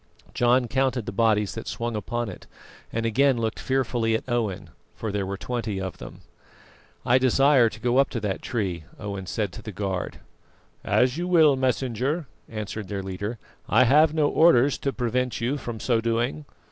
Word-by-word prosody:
John 120 +1 +3
counted 130 -1 0
the - - -4
bodies 105 -1 +2
that 115 - -7
swung 120 -1 -3
upon 120 +2 -3
it, 95 - -9 0.4
and 115 0 -2
again 130 +3 +3
looked 110 -1 -2
fearfully 120 -4 0
at 110 - -4
Owen, 105 -7 -2 0.2
for 110 - -4
there 100 -1 -2
were 100 0 -4
twenty 115 -3 -3
of 95 -1 -5
them. - - -10 0.8
"I 125 +1 +4
desire 130 -1 +4
to 110 - -11
go 120 +2 +1
up 140 - +3
to 120 - -3
that 100 -2 -2
tree," 95 -9 -3
Owen 100 -2 -6
said 105 -1 -2
to 115 - -8
the 110 0 -7
guard. 95 -2 -3 0.6
"As 125 +3 +2
you 175 - -2
will, 160 -5 +5
Messenger," 130 +4 -1 0.2
answered 105 -2 -5
their 100 -1 -4
leader; 100 +5 -4 0.3
"I 115 +5 +5
have 150 +5 +5
no 155 -2 +2
orders 145 -5 +4
to 140 - -1
prevent 125 0 -1
you 120 +4 0
from 120 -5 -6
so 115 -1 +1
doing. 120 +6 -1
115 Hz, 180 wpm, -25 LUFS, 105-130 Hz, 0.8 s, will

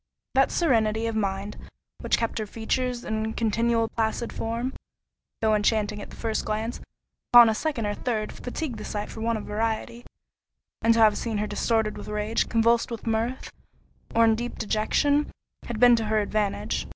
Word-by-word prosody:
That 270 +1 +4
serenity 225 -8 +1
of 225 -1 -2
mind 200 -1 -2 0.4
which - - +1
kept 230 0 -2
her 215 - -3
features 240 +3 -2
in 220 0 -2
a 220 0 -3
continual 230 +1 +1
placid 225 +1 -2
form, 235 +3 -3 0.7
though 220 -1 +3
enchanting 210 0 +1
at - - -9
the - - -11
first 225 -2 -2
glance, 220 +3 -3 0.5
upon 240 -1 +9
a - - +2
second 265 -2 -2
or 205 - -1
third, 215 -2 -2
fatigued 250 -2 -5
the - - -6
sight 210 0 -4
for 220 - -8
want 230 0 0
of 215 - -7
variety; 225 +2 -2 0.8
and 230 0 +4
to - - +2
have 215 -2 +5
seen 225 -3 -2
her 210 - 0
distorted 215 +1 0
with - - -9
rage, 210 +1 -1
convulsed 230 0 +3
with 230 -2 -6
mirth, 230 +3 -2 0.6
or 230 0 +6
in 225 - +5
deep 240 +2 -4
dejection, 285 +8 +1 0.4
had 235 -2 -4
been 245 0 +7
to 225 - -2
her 215 0 +1
advantage. 210 -1 -1
225 Hz, 180 wpm, -26 LUFS, 215-235 Hz, 0.8 s, upon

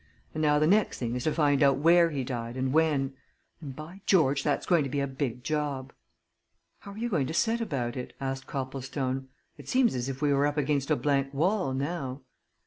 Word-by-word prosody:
And 155 - -3
now 150 -1 +4
the 150 - +3
next 205 +6 +3
thing 120 -2 -3
is 125 0 -3
to 155 - +2
find 145 -3 +2
out 140 -1 +5
where 170 +3 +5
he 140 -4 -3
died 120 -1 -5
and 130 0 -1
when. 150 -4 +2 0.5
And 140 -4 -7
by 165 +7 -10
George, 145 -7 +4
that's - - 0
going 170 -4 +3
to 135 - -3
be 140 +2 -1
a 140 - +1
big 130 -3 -4
job!" 145 -3 -2 0.9
"How 200 - -10
are - - -12
you 235 +2 -2
going 160 - 0
to 160 - -4
set 230 +4 +1
about 125 - -2
it?" 125 - -6
asked 135 0 -4
Copplestone. 135 0 -3 0.3
"It - - -10
seems 255 -2 +3
as 125 +1 -2
if 135 -1 -5
we 145 -1 +2
were 140 +1 +3
up 145 +1 -3
against 140 -1 0
a 155 - +4
blank 140 -2 0
wall, 175 -2 +1
now." 140 -2 -3
140 Hz, 220 wpm, -28 LUFS, 135-155 Hz, 0.9 s, out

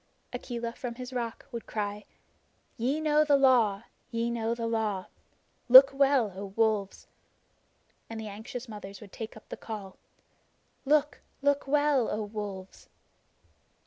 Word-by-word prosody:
Akela 235 -1 -4
from 240 -1 -6
his 250 +1 -8
rock 235 -2 -4
would 235 -2 -6
cry: 210 -1 -4 0.7
"Ye 260 +6 0
know 305 -1 +3
the 295 -2 +4
Law 235 -7 +4 0.3
ye 235 -1 -1
know 230 0 -1
the 230 -1 -4
Law. 220 -4 -1 0.6
Look 260 +2 +11
well, 270 -6 +3
O 195 +1 -5
Wolves!" 215 -3 0 1.0
And 225 -1 -6
the 220 - -6
anxious 220 +5 -7
mothers 200 -3 -9
would 205 -3 -13
take 220 -1 -7
up 220 - -16
the - - -6
call: 205 -4 -8 0.9
"Look 295 +1 +2 0.2
look 285 -1 +2
well, 290 -3 +2
O 215 +1 -2
Wolves!" 205 -3 -7
230 Hz, 140 wpm, -29 LUFS, 210-260 Hz, 1.0 s, Look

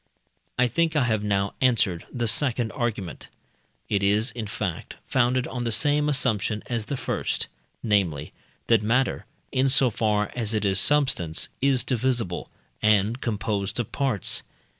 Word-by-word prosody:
I 125 - +4
think 165 +5 0
I 145 - +3
have 110 -3 0
now 100 -1 0
answered 110 -9 +2
the 120 -2 -2
second 120 0 +1
argument; 115 - -4 0.6
it 100 - 0
is, 105 +4 +2
in 115 -3 -5
fact, 95 -5 -4
founded 125 0 +1
on 125 -1 -4
the 115 - -1
same 150 +5 +2
assumption 110 -6 0
as 115 -3 -3
the 140 - -3
first - - -2 0.4
namely, 90 -9 0 0.3
that 115 -3 +4
matter, 125 +5 0 0.2
in 130 0 +2
so 130 -2 +4
far 105 -1 0
as 110 -3 0
it 105 -1 0
is 95 0 +4
substance, 130 - +2
is 135 -3 +2
divisible, 120 -7 -1 0.3
and 105 +3 +2
composed 105 -1 -2
of 120 - -3
parts. 130 -8 +1
115 Hz, 150 wpm, -25 LUFS, 105-130 Hz, 0.6 s, I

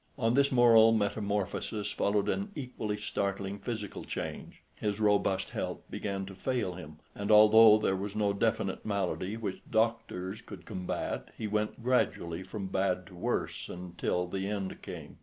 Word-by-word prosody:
On 115 -3 +2
this 140 +2 +4
moral 115 -3 +7
metamorphosis 105 0 -1
followed 100 0 +1
an 200 +1 -1
equally 125 -7 -4
startling 100 -1 -2
physical 110 -3 -5
change. - - -6
His 105 -1 -2
robust 105 -2 +2
health - - -3
began 100 -2 -3
to 95 - -9
fail 120 -2 -1
him, 80 -4 -10 0.2
and 100 +1 -4
although 110 0 +8
there 100 -3 +1
was 100 +2 -4
no 105 -1 +2
definite 110 -2 0
malady 100 0 -2
which 105 -4 -4
doctors 110 -4 0
could - - -11
combat, 95 -5 -4
he 110 - -4
went 105 +2 -2
gradually 90 -9 +1
from 95 +2 -6
bad 95 -1 0
to 95 - -14
worse 85 - -2
until 90 0 -2
the 95 +2 -3
end 100 -2 -4
came. - - -9
105 Hz, 155 wpm, -31 LUFS, 95-110 Hz, 0.2 s, although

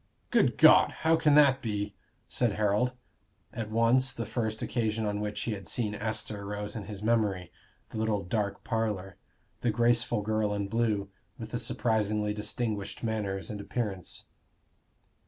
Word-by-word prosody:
"Good - - +3
God! - - +8 0.2
How 165 0 +6
can 150 -3 +4
that 140 -3 +6
be?" 105 -2 -2 0.3
said 120 -4 0
Harold. 105 +4 +1 0.6
At 110 -2 -4
once, 115 +4 +3
the 115 - -4
first 110 -1 -2
occasion 110 -2 -1
on 105 0 -1
which 105 0 -3
he 120 - -2
had 100 -4 -5
seen 105 +4 0
Esther 110 -1 -3
rose 105 +1 -4
in 105 -3 -5
his 105 0 -7
memory 105 -6 +1 0.4
the 110 - -4
little 110 -2 0
dark 100 +2 -2
parlor 105 -4 -2 0.4
the 120 - 0
graceful 120 0 +2
girl 110 -1 0
in 100 -1 -2
blue, 105 -3 0 0.3
with - - -8
the - - -2
surprisingly 105 -2 0
distinguished 105 0 -3
manners 105 -4 -2
and 105 -1 -5
appearance. 100 -5 -3
110 Hz, 155 wpm, -29 LUFS, 105-115 Hz, 0.6 s, God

